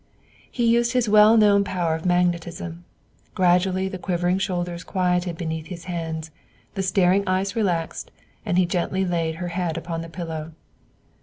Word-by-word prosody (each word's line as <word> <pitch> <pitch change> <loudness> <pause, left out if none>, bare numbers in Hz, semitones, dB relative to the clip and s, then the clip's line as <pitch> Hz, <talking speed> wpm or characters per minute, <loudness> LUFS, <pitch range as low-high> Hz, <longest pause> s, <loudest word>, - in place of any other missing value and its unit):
He 240 - -1
used 235 +1 +3
his 250 -2 +2
well 210 +2 +6
known 205 -2 +5
power 180 -4 -1
of 160 +3 -3
magnetism. 175 -1 -1 0.5
Gradually 185 +1 +2
the 190 -1 -6
quivering 180 0 0
shoulders 175 -3 -3
quieted 180 -2 0
beneath 160 -1 -4
his 170 -1 -8
hands; 160 -2 -5 0.4
the 195 - -2
staring 190 0 +3
eyes 190 +3 0
relaxed, 175 -7 -1 0.3
and 175 - -1
he 185 - +4
gently 185 +2 -1
laid 165 -2 -1
her 175 +1 -4
head 170 -2 -2
upon 165 0 -4
the 165 - -8
pillow. 165 -2 -6
180 Hz, 155 wpm, -23 LUFS, 170-190 Hz, 0.5 s, well